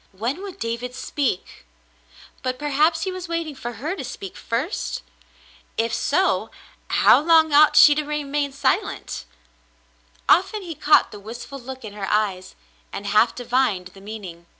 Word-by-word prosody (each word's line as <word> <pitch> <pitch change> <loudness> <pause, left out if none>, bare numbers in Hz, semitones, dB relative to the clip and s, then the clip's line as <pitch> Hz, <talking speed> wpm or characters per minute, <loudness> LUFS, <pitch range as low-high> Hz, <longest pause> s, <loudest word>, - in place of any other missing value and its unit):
When 235 - -3
would 395 -2 -8
David 235 +2 -4
speak? 260 - -3 0.8
But 255 0 -2
perhaps 300 +3 +2
he 380 - -2
was 370 -1 -6
waiting 335 -2 -3
for 240 -3 -6
her 295 - -4
to 320 - -6
speak 195 -6 -7
first? 260 - -3 0.7
If 230 0 0
so, 375 +6 +1 0.4
how - - +5
long 320 0 +4
ought 300 +1 +6
she 295 - +9
to 300 +1 -1
remain 290 -1 -2
silent? 280 +8 -1 1.0
Often 390 +3 +3
he 340 -2 -6
caught 300 +1 +4
the 210 - -9
wistful 235 +6 -8
look 260 0 -9
in 205 - -8
her 200 -2 -5
eyes, 195 -3 -1 0.4
and 200 - -6
half 215 +3 +3
divined 240 -7 0
the 195 +1 -16
meaning. 195 -5 -9
260 Hz, 150 wpm, -23 LUFS, 220-310 Hz, 1.0 s, she